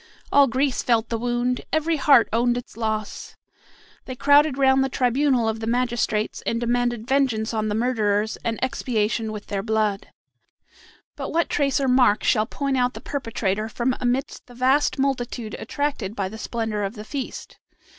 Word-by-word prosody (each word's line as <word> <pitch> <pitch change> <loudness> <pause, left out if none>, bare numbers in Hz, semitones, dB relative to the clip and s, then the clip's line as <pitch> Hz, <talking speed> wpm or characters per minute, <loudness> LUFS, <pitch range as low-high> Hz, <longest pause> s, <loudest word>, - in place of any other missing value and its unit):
All 280 -1 +6
Greece 260 +2 0
felt 230 -2 +1
the 230 - -1
wound, 245 +1 -1
every 315 +1 +1
heart 275 -4 +5
owned 240 +1 +2
its 245 - -8
loss. 220 -2 -4 0.7
They 255 - -6
crowded 285 +1 +4
round 265 -1 +4
the 270 - -1
tribunal 255 -1 +1
of 220 0 -1
the 220 - -4
magistrates, 235 -3 -1
and 230 - -1
demanded 240 -1 0
vengeance 255 -5 +1
on 215 -1 -1
the 210 - -1
murderers 220 -3 0
and 230 -1 -3
expiation 225 -4 -1
with 210 -1 -7
their 200 -1 -3
blood. 215 -2 -1 1.1
But - - -5
what 335 +1 0
trace 280 -2 +1
or 270 - 0
mark 250 -4 +4
shall 215 0 +2
point 275 -2 -2
out 250 0 +1
the - - -6
perpetrator 220 -6 -2
from 245 +3 -1
amidst 250 +2 -2
the 245 - -14
vast 265 +5 +2
multitude 245 -4 -2
attracted 280 -9 -3
by 195 -3 -2
the 220 +2 -9
splendor 220 -3 -3
of 200 +3 -3
the 210 0 -8
feast? 270 +2 -6
240 Hz, 170 wpm, -23 LUFS, 220-265 Hz, 1.1 s, All